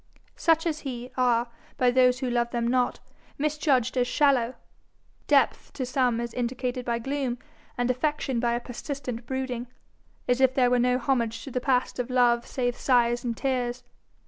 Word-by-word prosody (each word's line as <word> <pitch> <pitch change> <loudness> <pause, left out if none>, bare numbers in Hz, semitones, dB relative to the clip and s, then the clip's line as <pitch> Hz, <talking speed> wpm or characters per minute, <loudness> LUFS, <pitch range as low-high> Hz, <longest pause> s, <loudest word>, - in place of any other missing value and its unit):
Such 325 0 +2
as 315 -2 -1
he, 250 -2 -6
are, 245 -2 +2 0.3
by 250 -1 +3
those 250 0 +3
who 255 - -1
love 240 0 +1
them 235 -1 -1
not, 250 0 +1 0.4
misjudged 285 -4 +1
as 245 -1 +2
shallow. 260 -4 +2 0.7
Depth - - +2
to 260 - -3
some 245 -2 +1
is 235 -1 -4
indicated 250 0 -3
by 235 -1 0
gloom, 265 0 -2 0.4
and 245 0 +1
affection 265 -1 -1
by 235 0 +1
a 240 - 0
persistent 250 -1 -6
brooding 255 -2 -3 0.6
as 250 +1 +2
if 260 0 +4
there 250 -2 +3
were 250 - +3
no 250 +1 +3
homage 235 -3 -1
to 275 - -8
the 250 - -2
past 255 -1 0
of 245 0 -2
love 240 -2 +3
save 245 -2 -1
sighs 240 -2 +2
and 235 -2 -3
tears. 250 -2 -1
250 Hz, 170 wpm, -26 LUFS, 240-260 Hz, 0.7 s, if